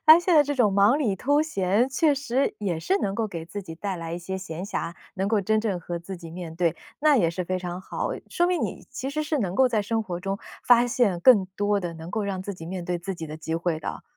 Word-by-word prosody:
但 315 Hz, +1 st, +10 dB
是 -, -, -12 dB
现 360 Hz, -, +4 dB
在 300 Hz, -, +8 dB
这 290 Hz, 0 st, -2 dB
种 225 Hz, -7 st, +3 dB
忙 205 Hz, +8 st, +5 dB
里 215 Hz, -10 st, 0 dB
偷 285 Hz, +8 st, +2 dB
闲， 210 Hz, -5 st, +1 dB
确 290 Hz, +3 st, +3 dB
实 275 Hz, -1 st, 0 dB
也 185 Hz, -6 st, -1 dB
是 385 Hz, -, +1 dB
能 195 Hz, -, -1 dB
够 225 Hz, +1 st, 0 dB
给 170 Hz, -4 st, -6 dB
自 195 Hz, +4 st, -6 dB
己 165 Hz, -3 st, -8 dB
带 190 Hz, +2 st, -3 dB
来 165 Hz, 0 st, -5 dB
一 170 Hz, -, -3 dB
些 190 Hz, +2 st, -4 dB
闲 180 Hz, -1 st, -6 dB
暇， 170 Hz, -4 st, -3 dB, 0.2 s
能 195 Hz, 0 st, -1 dB
够 215 Hz, -1 st, +2 dB
真 215 Hz, +3 st, +2 dB
正 205 Hz, -5 st, -1 dB
和 170 Hz, 0 st, -4 dB
自 185 Hz, +3 st, -7 dB
己 170 Hz, -2 st, -10 dB
面 170 Hz, -1 st, -7 dB
对， 170 Hz, -2 st, +1 dB, 0.2 s
那 300 Hz, -1 st, +5 dB
也 170 Hz, -9 st, +3 dB
是 180 Hz, +2 st, -3 dB
非 185 Hz, +1 st, -1 dB
常 180 Hz, 0 st, -5 dB
好， 190 Hz, -, -3 dB, 0.2 s
说 350 Hz, -, +2 dB
明 355 Hz, -4 st, +1 dB
你 -, -, -4 dB
其 265 Hz, +1 st, -4 dB
实 305 Hz, +2 st, -1 dB
是 305 Hz, 0 st, -1 dB
能 190 Hz, -7 st, -1 dB
够 260 Hz, +4 st, +5 dB
在 220 Hz, -4 st, +1 dB
生 225 Hz, +2 st, -1 dB
活 180 Hz, -4 st, -5 dB
中 195 Hz, +1 st, -2 dB, 0.3 s
发 245 Hz, 0 st, +6 dB
现 230 Hz, -8 st, +1 dB
更 205 Hz, -3 st, +6 dB
多 205 Hz, 0 st, +1 dB
的 175 Hz, -2 st, -4 dB
能 165 Hz, +2 st, -8 dB
够 215 Hz, -1 st, -1 dB
让 190 Hz, -2 st, -3 dB
自 200 Hz, -, -4 dB
己 165 Hz, -2 st, -9 dB
面 180 Hz, 0 st, -5 dB
对 175 Hz, 0 st, -1 dB
自 190 Hz, +3 st, -4 dB
己 165 Hz, -2 st, -6 dB
的 155 Hz, 0 st, -7 dB
机 160 Hz, 0 st, -4 dB
会 165 Hz, -1 st, -1 dB
的。 -, -, -5 dB
195 Hz, 295 characters per minute, -26 LUFS, 175-245 Hz, 0.3 s, 但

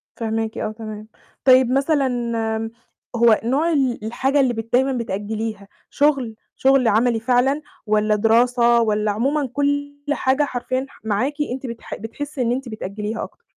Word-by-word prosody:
فاهماكِ 225 Hz, -1 st, -2 dB
آه، 215 Hz, -, -2 dB
تمام. 215 Hz, -1 st, -8 dB, 0.4 s
طيب 255 Hz, -1 st, +6 dB
مثلًا 275 Hz, 0 st, +2 dB, 1.1 s
هو 230 Hz, -2 st, +5 dB
نوع 290 Hz, +8 st, +1 dB
ال 260 Hz, -7 st, 0 dB
الحاجة 270 Hz, +5 st, 0 dB
اللي 255 Hz, -3 st, +3 dB
بت 225 Hz, +1 st, -6 dB
دايمًا 265 Hz, +2 st, +3 dB
بتأجّليها، 215 Hz, -2 st, -4 dB, 0.2 s
شغل، 275 Hz, -6 st, +1 dB, 0.2 s
شغل 265 Hz, -2 st, +3 dB
عَمَلي 225 Hz, +2 st, +3 dB
فعلًا 255 Hz, +5 st, +2 dB, 0.2 s
والَّا 215 Hz, 0 st, +2 dB
دراسة، 235 Hz, +2 st, +4 dB
والَّا 210 Hz, -1 st, +1 dB
عمومًا 270 Hz, +5 st, 0 dB
كُلّ 285 Hz, 0 st, -1 dB
حاجة 270 Hz, +1 st, +2 dB
حرفيًا 255 Hz, 0 st, -2 dB
ح -, -, -19 dB
معاكِ 230 Hz, +7 st, 0 dB, 0.2 s
أنتِ 265 Hz, +1 st, -6 dB
بتح 235 Hz, -1 st, -6 dB
بتحسي 275 Hz, +6 st, -6 dB
إن 235 Hz, 0 st, +1 dB
أنتِ 255 Hz, 0 st, -3 dB
بتأجِّليها 210 Hz, +1 st, -4 dB
أكتر؟ 470 Hz, -, -11 dB
240 Hz, 145 wpm, -21 LUFS, 220-270 Hz, 1.1 s, طيب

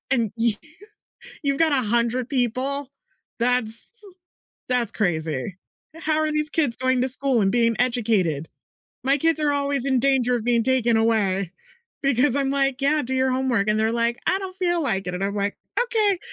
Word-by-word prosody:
and 230 Hz, -6 st, +1 dB
you 230 Hz, -2 st, +2 dB, 0.9 s
you've 275 Hz, -1 st, 0 dB
got 325 Hz, -2 st, +3 dB
100 235 Hz, -1 st, 0 dB
people? 265 Hz, +2 st, -1 dB, 0.5 s
That's 235 Hz, -2 st, +2 dB, 0.8 s
that's 245 Hz, -4 st, +1 dB
crazy. 160 Hz, -, -2 dB, 0.4 s
How 315 Hz, -1 st, -1 dB
are 310 Hz, 0 st, 0 dB
these 305 Hz, 0 st, 0 dB
kids 295 Hz, -8 st, +1 dB
going 260 Hz, 0 st, +1 dB
to 260 Hz, -, +1 dB
school 265 Hz, -1 st, +1 dB
and 195 Hz, -1 st, +2 dB
being 230 Hz, -1 st, +2 dB
educated? 210 Hz, -, 0 dB, 0.5 s
My 275 Hz, +2 st, +2 dB
kids 325 Hz, +1 st, +1 dB
are 295 Hz, -1 st, +2 dB
always 280 Hz, -2 st, +1 dB
in 265 Hz, -2 st, +2 dB
danger 250 Hz, -2 st, +2 dB
of 225 Hz, -, -3 dB
being 235 Hz, -2 st, +2 dB
taken 250 Hz, -3 st, +2 dB
away 200 Hz, -5 st, +1 dB, 0.5 s
because 275 Hz, -1 st, +3 dB
I'm 275 Hz, -1 st, 0 dB
like, 275 Hz, -1 st, 0 dB
"Yeah, 295 Hz, +2 st, +2 dB
do 260 Hz, +2 st, -3 dB
your 260 Hz, 0 st, +1 dB
homework," 255 Hz, -5 st, 0 dB
and 210 Hz, -, +2 dB
they're 220 Hz, +1 st, +1 dB
like, 235 Hz, 0 st, -1 dB
"I 380 Hz, -, +2 dB
don't 380 Hz, -1 st, -7 dB
feel 350 Hz, -2 st, 0 dB
like 195 Hz, -8 st, 0 dB
it," 180 Hz, -, -3 dB
and 190 Hz, -, -3 dB
I'm 200 Hz, +1 st, -2 dB
like, 200 Hz, 0 st, -2 dB, 0.2 s
"Okay." 445 Hz, -4 st, +1 dB
Like 375 Hz, -, -3 dB
250 Hz, 180 wpm, -23 LUFS, 225-280 Hz, 0.9 s, got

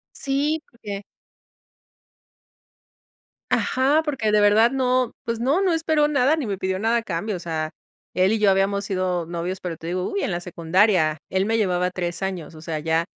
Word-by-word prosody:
Sí, 290 Hz, +3 st, -1 dB
porque 205 Hz, -4 st, -7 dB, 2.5 s
ajá, 280 Hz, +5 st, +2 dB
porque 265 Hz, -8 st, -1 dB
de 210 Hz, -, +5 dB
verdad 215 Hz, +3 st, +5 dB
no, 255 Hz, -2 st, +1 dB
pues 230 Hz, -1 st, -2 dB
no, 280 Hz, +9 st, +2 dB
no 365 Hz, -3 st, +2 dB
esperó 315 Hz, -2 st, +2 dB
nada 285 Hz, +1 st, +3 dB
ni 285 Hz, -7 st, -3 dB
me 195 Hz, -2 st, -3 dB
pidió 190 Hz, 0 st, -1 dB
nada 225 Hz, +3 st, +1 dB
a -, -, -3 dB
cambio. 200 Hz, +1 st, -3 dB
O -, -, -5 dB
sea, 160 Hz, -2 st, -3 dB, 0.4 s
él 185 Hz, +3 st, +3 dB
y 225 Hz, -, +1 dB
yo 205 Hz, -2 st, +4 dB
habíamos 195 Hz, +1 st, +1 dB
sido 185 Hz, -3 st, -1 dB
novios, 175 Hz, +2 st, -4 dB
pero 170 Hz, -3 st, -4 dB
te 165 Hz, -, -10 dB
digo, 180 Hz, +2 st, -2 dB
uy, 400 Hz, -, -2 dB
en -, -, -1 dB
la 175 Hz, 0 st, -2 dB
secundaria. 170 Hz, -2 st, +2 dB
Él 190 Hz, +1 st, +1 dB
me 225 Hz, 0 st, +1 dB
llevaba 180 Hz, -4 st, +1 dB
3 175 Hz, 0 st, -4 dB
años. 180 Hz, -4 st, -4 dB
O 155 Hz, -, -12 dB
sea, 160 Hz, -2 st, -3 dB
ya 160 Hz, +2 st, +1 dB
195 Hz, 185 wpm, -23 LUFS, 175-250 Hz, 2.5 s, de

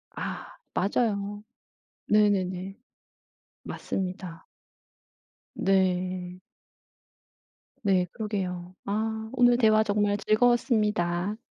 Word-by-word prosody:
아 -, -, -6 dB, 0.2 s
맞아요. 205 Hz, 0 st, 0 dB, 0.6 s
네네네. 195 Hz, -2 st, +2 dB, 0.9 s
맞습니다. 185 Hz, -3 st, -5 dB, 1.1 s
네. 185 Hz, -1 st, 0 dB, 1.4 s
네. 190 Hz, -3 st, +3 dB
그러게요. 185 Hz, -5 st, -4 dB
아 220 Hz, +2 st, -2 dB
오늘 245 Hz, -1 st, +5 dB
대화 220 Hz, -2 st, +5 dB
정말 205 Hz, -1 st, +1 dB
즐거웠습니다. 215 Hz, -5 st, +2 dB
205 Hz, 155 characters per minute, -27 LUFS, 185-215 Hz, 1.4 s, 오늘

